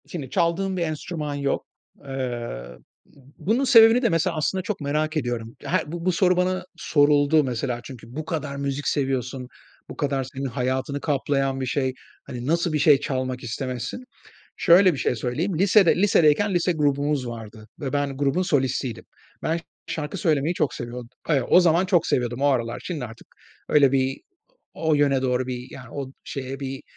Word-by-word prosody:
Şimdi 145 Hz, -7 st, -6 dB
çaldığım 185 Hz, +5 st, 0 dB
bir -, -, -1 dB
enstrüman 155 Hz, -2 st, -3 dB
yok. 140 Hz, -1 st, -1 dB, 0.4 s
Eee, 120 Hz, -, -4 dB, 0.8 s
bunun 230 Hz, +8 st, +1 dB
sebebini 235 Hz, -2 st, +7 dB
de 235 Hz, -, +3 dB
mesela, 165 Hz, -1 st, +1 dB
aslında, 155 Hz, +5 st, 0 dB
çok 195 Hz, -2 st, -4 dB
merak 155 Hz, +2 st, -1 dB
ediyorum. 120 Hz, -4 st, -3 dB
Her 165 Hz, -4 st, -1 dB
bu 170 Hz, 0 st, -5 dB
bu 185 Hz, -, +3 dB
soru 180 Hz, +1 st, +3 dB
bana 185 Hz, 0 st, 0 dB
soruldu, 145 Hz, 0 st, +3 dB
mesela. 125 Hz, -1 st, -2 dB
Çünkü 120 Hz, -4 st, -10 dB
bu 155 Hz, 0 st, -4 dB
kadar 155 Hz, -3 st, -3 dB
müzik 140 Hz, 0 st, -3 dB
seviyorsun, 130 Hz, -2 st, -1 dB, 0.4 s
bu -, -, -9 dB
kadar 140 Hz, -3 st, 0 dB
senin 135 Hz, +1 st, -6 dB
hayatını 130 Hz, +2 st, -2 dB
kaplayan 135 Hz, -2 st, 0 dB
bir -, -, -1 dB
şey, 130 Hz, +1 st, -1 dB, 0.3 s
hani, 125 Hz, 0 st, -7 dB
nasıl 170 Hz, +1 st, +1 dB
bir 150 Hz, -, +1 dB
şey 145 Hz, -1 st, +6 dB
çalmak 130 Hz, -2 st, -3 dB
istemezsin? 125 Hz, -, -4 dB, 0.5 s
Şöyle 185 Hz, +1 st, +6 dB
bir 145 Hz, -, -5 dB
şey -, -, +1 dB
söyleyeyim. 155 Hz, -, -2 dB
Lisede 195 Hz, -1 st, +5 dB
lisedeyken 190 Hz, 0 st, +3 dB
lise 175 Hz, +1 st, +2 dB
grubumuz 145 Hz, -3 st, 0 dB
vardı 110 Hz, -2 st, -9 dB
ve 135 Hz, -3 st, -3 dB
ben 145 Hz, -1 st, -1 dB
grubun 145 Hz, +6 st, +1 dB
solistiydim. 130 Hz, -7 st, -1 dB, 0.4 s
Ben 165 Hz, +1 st, 0 dB, 0.3 s
şarkı 150 Hz, +3 st, -4 dB
söylemeyi 155 Hz, 0 st, +1 dB
çok 150 Hz, -, 0 dB
seviyord 120 Hz, +1 st, -6 dB, 0.2 s
Eee, 145 Hz, -5 st, +3 dB
o 180 Hz, -, +7 dB
zaman 175 Hz, +1 st, +3 dB
çok 180 Hz, -3 st, +3 dB
seviyordum, 120 Hz, 0 st, 0 dB
o -, -, +4 dB
aralar. 120 Hz, -4 st, 0 dB
Şimdi 160 Hz, -8 st, -4 dB
artık 115 Hz, -1 st, -11 dB, 0.4 s
öyle 140 Hz, -3 st, +5 dB
bir 135 Hz, 0 st, 0 dB, 0.5 s
o 160 Hz, -1 st, +1 dB
yöne 140 Hz, -2 st, +2 dB
doğru 125 Hz, -1 st, 0 dB
bir 125 Hz, -1 st, -5 dB
yani, 125 Hz, -3 st, -11 dB
o 135 Hz, -2 st, -6 dB
şeye, 135 Hz, 0 st, -6 dB
bir 135 Hz, -1 st, -5 dB
145 Hz, 170 wpm, -24 LUFS, 130-165 Hz, 0.8 s, sebebini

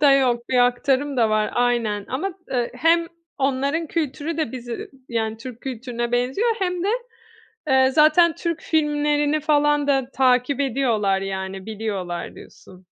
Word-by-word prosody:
da 285 Hz, -2 st, +6 dB
yok. 245 Hz, -3 st, +2 dB
Bir 255 Hz, -, +2 dB
aktarım 270 Hz, +3 st, 0 dB
da 225 Hz, -3 st, +3 dB
var, 215 Hz, 0 st, +1 dB
aynen 235 Hz, -4 st, 0 dB
ama, 365 Hz, +9 st, -2 dB, 0.2 s
eee, 245 Hz, -3 st, -1 dB
hem 335 Hz, +1 st, +3 dB, 0.3 s
onların 280 Hz, +4 st, 0 dB
kültürü 310 Hz, 0 st, -3 dB
de 310 Hz, -8 st, -2 dB
bizi 240 Hz, -2 st, -6 dB, 0.2 s
yani 225 Hz, -2 st, -2 dB
Türk 235 Hz, +1 st, -9 dB
kültürüne 240 Hz, -2 st, -4 dB
benziyor 255 Hz, -, +1 dB
hem 360 Hz, -3 st, -1 dB
de, -, -, +1 dB, 0.8 s
eee, 265 Hz, -1 st, +4 dB
zaten 310 Hz, +3 st, +5 dB
Türk 335 Hz, -2 st, -3 dB
filmlerini 295 Hz, -1 st, +1 dB
falan 295 Hz, -1 st, +2 dB
da 270 Hz, -2 st, +1 dB
takip 255 Hz, +1 st, +2 dB
ediyorlar, 225 Hz, -8 st, +1 dB
yani, 190 Hz, 0 st, -5 dB
biliyorlar 200 Hz, -5 st, -4 dB
diyorsun. 185 Hz, 0 st, -15 dB
260 Hz, 145 wpm, -22 LUFS, 235-295 Hz, 0.8 s, da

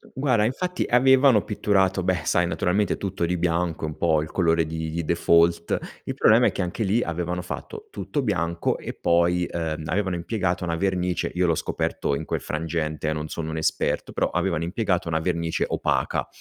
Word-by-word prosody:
guarda 130 Hz, -5 st, +2 dB
infatti, 180 Hz, +11 st, -1 dB
avevano 130 Hz, -2 st, +5 dB
pitturato 95 Hz, -2 st, +1 dB
beh, 90 Hz, -3 st, +1 dB
sai, 90 Hz, 0 st, +2 dB
naturalmente 95 Hz, +4 st, 0 dB
tutto 95 Hz, -3 st, -2 dB
di 90 Hz, +1 st, 0 dB
bianco, 85 Hz, -1 st, -1 dB
è -, -, -3 dB
un 75 Hz, -, -6 dB
po' 80 Hz, -3 st, +2 dB
il 80 Hz, -, -9 dB
colore 85 Hz, -2 st, +2 dB
di 80 Hz, +1 st, -4 dB
default, 85 Hz, 0 st, +3 dB, 0.3 s
il -, -, -4 dB
problema -, -, +5 dB
è -, -, +1 dB
che, -, -, -2 dB
anche 90 Hz, +5 st, -3 dB
lì, 110 Hz, +4 st, +2 dB
avevano 90 Hz, +1 st, -3 dB
fatto 435 Hz, -, -7 dB
tutto 145 Hz, -, -3 dB
bianco 85 Hz, -6 st, 0 dB
e -, -, -6 dB
poi, 85 Hz, +1 st, +2 dB
ehm, 80 Hz, -2 st, -3 dB
avevano 95 Hz, +2 st, -1 dB
impiegato 90 Hz, 0 st, -2 dB
una 85 Hz, -1 st, -1 dB
vernice 90 Hz, -1 st, -1 dB
io 90 Hz, -, +2 dB
l'ho 85 Hz, -, +3 dB
scoperto 70 Hz, -, -2 dB
in -, -, -5 dB
quel -, -, -2 dB
frangente, 80 Hz, -1 st, -3 dB
eh, -, -, 0 dB
non 75 Hz, 0 st, -4 dB
sono 80 Hz, 0 st, -5 dB
un 80 Hz, -, -4 dB
esperto, 80 Hz, -, -1 dB
però, -, -, 0 dB
avevano 85 Hz, -4 st, 0 dB
impiegato 90 Hz, 0 st, -1 dB
una 80 Hz, -1 st, +1 dB
vernice 85 Hz, -1 st, -1 dB
opaca. -, -, -1 dB
90 Hz, 185 wpm, -24 LUFS, 80-95 Hz, 0.3 s, avevano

